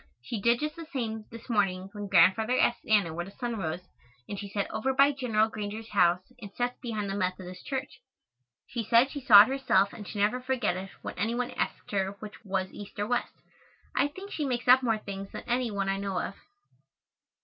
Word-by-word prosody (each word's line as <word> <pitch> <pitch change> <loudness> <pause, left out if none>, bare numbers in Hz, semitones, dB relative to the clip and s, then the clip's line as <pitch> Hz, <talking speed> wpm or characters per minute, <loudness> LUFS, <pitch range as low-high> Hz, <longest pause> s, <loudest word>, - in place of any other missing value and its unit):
She 215 - -4
did 235 +2 +3
just 300 +1 -2
the 330 -2 -9
same, 220 -5 -3
this 230 0 -11
morning, 195 -4 0
when 205 -1 -6
Grandfather 195 +7 +4
asked 240 - +1
Anna 205 -7 +3
where 175 +2 -3
the - - -10
sun 235 +2 -4
rose, 165 -2 -3 0.5
and 200 - -5
she 200 - -6
said 200 0 -1
"over 260 +5 -1
by 275 +2 +6
Gen. 255 -5 -5 0.2
Granger's 215 +1 -5
house 180 -2 +3 0.2
and 200 -3 -8
sets 245 0 -2
behind 215 -5 -3
the 195 - -3
Methodist 185 -1 -4
church." 265 -1 -4 0.6
She 235 -2 -4
said 235 +5 +4
she 285 - -5
saw 210 -5 +10
it - - -3
herself 260 -7 +2
and 205 - -9
should 210 - -7
never 210 +5 +1
forget 250 -7 0
it 190 +1 -6
when - - -5
any 225 +4 0
one 250 +1 -2
asked - - -3
her 195 -1 0
which 210 +2 -11
was 190 -2 -2
east 205 +1 -10
or 205 - 0
west. 245 +2 -1 0.6
I - - +3
think 380 +7 -10
she 305 - -2
makes 250 -3 -2
up 255 +1 +8
more 230 -4 +1
things 195 -2 -7
than - - -7
any 245 0 0
one 200 -2 -2
I 195 0 0
know 195 -2 -2
of. - - -3
215 Hz, 215 wpm, -29 LUFS, 195-245 Hz, 0.6 s, saw